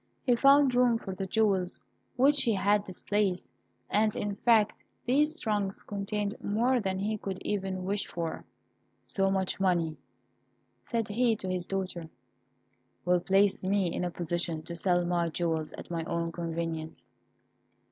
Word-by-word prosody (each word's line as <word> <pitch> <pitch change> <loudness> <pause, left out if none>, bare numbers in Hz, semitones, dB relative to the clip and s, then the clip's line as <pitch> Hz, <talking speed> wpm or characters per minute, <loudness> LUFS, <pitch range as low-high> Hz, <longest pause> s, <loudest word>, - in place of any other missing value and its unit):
He 245 - +3
found 275 +1 +5
room 245 -2 +4
for 195 -4 -6
the 190 0 -4
jewels 195 -4 +1 0.4
which 280 +2 +4
he 230 - +2
had 200 +1 +2
displaced, 195 -1 -1 0.4
and, 215 0 +2
in 205 -1 -2
fact, 220 -1 +2 0.2
these 300 +6 +2
trunks 205 -3 -1
contained 205 0 -3
more 240 +5 +2
than 190 -3 -1
he 210 +2 -2
could 195 -2 -4
even 190 -2 -2
wish 200 +1 -1
for. 165 -2 -4 0.6
"So 195 -1 0
much 190 -1 -1
money," 170 -4 +1 0.9
said 230 -3 0
he 230 +2 +2
to 190 - -6
his 180 -1 -2
daughter, 185 -4 -4 1.0
"will 180 0 +3
place 195 +2 +2
me 190 -2 +1
in - - -2
a 180 - 0
position 170 -1 -2
to 170 +1 -7
sell 175 0 +1
my 175 -1 +1
jewels 160 -2 -1
at - - -9
my 165 -1 -2
own 170 0 -2
convenience. 165 -1 -4
195 Hz, 150 wpm, -29 LUFS, 175-215 Hz, 1.0 s, found